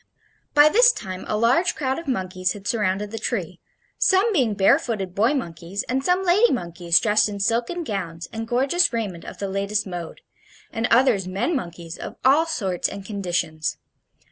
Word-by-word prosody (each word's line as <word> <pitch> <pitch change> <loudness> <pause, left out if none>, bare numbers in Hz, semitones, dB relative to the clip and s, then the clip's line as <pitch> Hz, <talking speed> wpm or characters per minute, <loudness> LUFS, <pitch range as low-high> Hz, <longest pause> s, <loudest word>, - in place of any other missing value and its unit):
By 295 +1 +8
this 485 +9 +6
time 185 - -7
a 210 - -1
large 255 +11 +2
crowd 265 -1 -2
of 335 - -11
monkeys 185 -6 -1
had 205 -1 -9
surrounded 205 -2 -1
the 225 - -5
tree, 190 -7 -3 0.4
some 400 +4 +3
being 245 - +1
barefooted 200 - +1
boy 225 +9 +2
monkeys, 175 - -4
and 265 +2 -1
some 360 +4 +2
lady 390 +6 +4
monkeys 170 -5 +1
dressed 210 0 +2
in 200 -1 -6
silken 235 - 0
gowns 175 - -5
and 225 0 -5
gorgeous 275 +9 +2
raiment 205 -8 -4
of - - -9
the 200 - -3
latest 200 +2 -1
mode, 175 -3 -7 0.5
and 225 -1 0
others 235 -6 +3
men 210 - -1
monkeys 170 -7 -6
of - - -7
all 295 +5 +5
sorts 195 - -1
and 200 -1 -8
conditions. 175 -6 -2
210 Hz, 170 wpm, -23 LUFS, 185-265 Hz, 0.5 s, By